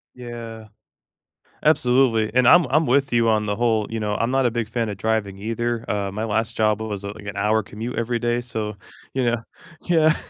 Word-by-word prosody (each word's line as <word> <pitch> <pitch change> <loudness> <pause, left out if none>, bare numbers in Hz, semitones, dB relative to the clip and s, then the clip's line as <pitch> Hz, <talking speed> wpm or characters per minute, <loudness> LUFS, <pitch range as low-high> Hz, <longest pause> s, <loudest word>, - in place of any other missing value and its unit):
Yeah. 115 -3 -8 1.0
Absolutely, 125 -6 +3
and 125 -1 +5
I'm 175 -2 +7
I'm 155 +3 +3
with 135 +1 +2
you 115 -1 +3
on 110 -1 +2
the 105 -1 -1
whole 110 -2 +1
you 115 - -3
know, 105 -1 -1
I'm 115 +3 0
not 135 -1 +2
a - - +2
big 115 -1 -2
fan 115 -1 -2
of 100 - -4
driving 110 -2 -1
either. 115 +3 -2
Uh, 100 -1 -1
my 105 +3 -4
last 110 +1 -1
job 110 -1 +2
was, 105 -3 -4
uh, 100 - -4
like, 105 - -12
an 105 - -6
hour 110 +1 +2
commute 110 +5 -6
every 120 +1 0
day, 120 +1 0
so, 110 -4 -4 0.4
you 130 -1 0
know 120 -1 0 0.4
yeah. 160 -3 +3
115 Hz, 210 wpm, -22 LUFS, 105-120 Hz, 1.0 s, I'm